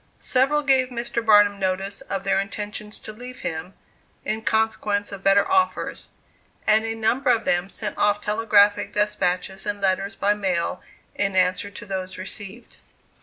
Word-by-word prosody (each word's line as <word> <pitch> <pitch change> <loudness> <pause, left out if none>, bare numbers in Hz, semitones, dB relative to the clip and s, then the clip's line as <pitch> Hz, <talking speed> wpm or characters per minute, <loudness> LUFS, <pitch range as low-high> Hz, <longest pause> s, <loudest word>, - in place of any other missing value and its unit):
Several 275 +4 +2
gave 265 -2 +3
Mr. 235 -1 -3
Barnum 205 -2 +5
notice 195 +1 -2
of 195 -1 -4
their 195 0 +2
intention 210 +1 -5
to 215 0 -6
leave 250 +3 -9
him, 165 +4 -5 0.5
in 220 +1 -1
consequence 220 -2 0
of 195 -1 -8
better 195 +1 +4
offers; 380 -1 0 0.6
and 215 +1 +4
a 225 0 -3
number 240 +5 +1
of 230 -2 +3
them 175 +2 +1
sent 210 +1 -5
off 205 0 +3
telegraphic 210 -1 +2
despatches 190 -2 0
and 205 0 -2
letters 195 +1 0
by 205 +1 +2
mail, 190 -5 -2 0.3
in 195 -1 -1
answer 185 +2 +2
to 205 +2 -10
those 190 -1 -5
received. 200 +4 -9
205 Hz, 155 wpm, -23 LUFS, 195-220 Hz, 0.6 s, Barnum